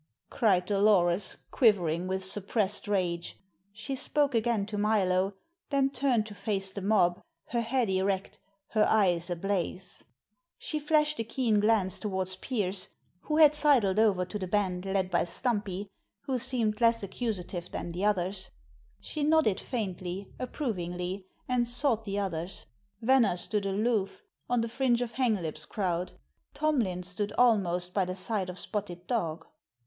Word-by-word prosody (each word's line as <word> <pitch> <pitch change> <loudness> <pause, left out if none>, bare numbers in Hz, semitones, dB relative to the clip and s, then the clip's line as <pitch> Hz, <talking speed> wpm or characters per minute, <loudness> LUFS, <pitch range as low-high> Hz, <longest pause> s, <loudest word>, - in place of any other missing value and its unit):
cried 190 -6 +2
Dolores, 195 -2 +3
quivering 180 - +2
with 190 0 -1
suppressed 205 +1 +1
rage. 180 -4 -1 0.3
She 220 +6 -5
spoke 285 +1 +1
again 225 -3 +1
to 210 0 -5
Milo, 195 -2 +2 0.3
then 275 -1 +2
turned 255 -6 +1
to 215 - -9
face 195 -2 0
the 200 - -6
mob, 190 -3 +2 0.3
her 235 0 0
head 240 +1 0
erect, 190 0 -1 0.3
her 215 -2 +3
eyes 180 -5 +2
ablaze. 185 +1 -1 0.5
She 305 - -3
flashed 300 -1 +2
a - - +1
keen 225 -2 +1
glance 205 -3 +2
toward 190 -3 -2
Pearse, 200 -7 -2 0.3
who 305 +8 -2
had 305 -2 +7
sidled 265 -10 +3
over 200 -5 +3
to 210 +3 -6
the 185 - -3
band 185 -2 0
led 190 -1 -1
by 175 - +3
Stumpy, 205 0 -1 0.3
who 265 -3 -2
seemed 225 -3 0
less 230 -1 +4
accusative 190 -4 -4
than - - -5
the 180 +3 -4
others; 190 -2 0 0.5
she 305 - -6
nodded 300 -10 +3
faintly, 190 -4 -4
approvingly, 185 - -4 0.2
and 245 -1 +1
sought 240 -2 +1
the 200 -1 -3
others. 180 -3 -4 0.4
Venner 235 -7 +4
stood 200 +2 -1
aloof, 200 0 -1 0.3
on 245 -1 +2
the 230 - -1
fringe 245 0 +1
of 235 - -6
Hanglip's 195 - -1
crowd; 180 -3 -2 0.4
Tomlin 235 -13 0
stood 200 +3 -1
almost 180 -7 +2
by 195 - +2
the 185 0 -4
side 195 -1 -1
of 180 - -7
Spotted 180 -3 -4
Dog. 165 -9 -2
205 Hz, 145 wpm, -29 LUFS, 185-235 Hz, 0.5 s, had